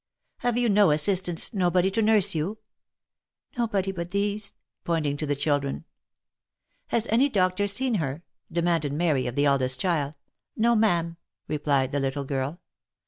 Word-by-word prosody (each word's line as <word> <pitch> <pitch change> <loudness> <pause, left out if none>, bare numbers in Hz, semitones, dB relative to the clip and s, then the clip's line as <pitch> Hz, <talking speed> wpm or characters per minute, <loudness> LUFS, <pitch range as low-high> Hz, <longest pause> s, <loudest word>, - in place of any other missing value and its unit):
" - - -50
Have 245 -1 -1
you 245 -1 +2
no 205 -3 +4
assistance, 175 +5 +2
nobody 180 -1 +2
to 225 +3 0
nurse 215 -3 +4
you 165 +6 -2
V* - - -37 0.5
" - - -35
Nobody 200 -5 0
but 170 -2 -6
these," 200 +1 -1 0.3
pointing 155 -4 -1
to 155 - -3
the 145 - 0
children. 145 +1 -1 0.5
" - - -63 0.2
Has 235 -1 +1
any 255 +6 +4
doctor 190 -2 +1
seen 250 +5 +1
her 145 +3 -4
?" - - -36
demanded 165 -4 0
Mary 150 -5 0
of 120 - -5
the 145 - +2
eldest 130 -2 +1
child. 155 -5 -1 0.2
" - - -60
No 235 +2 +3
ma'am," 170 -6 +1 0.3
replied 140 -3 0
the 145 - -1
little 135 +1 -2
girl. 135 +4 -3
170 Hz, 175 wpm, -26 LUFS, 145-205 Hz, 0.5 s, no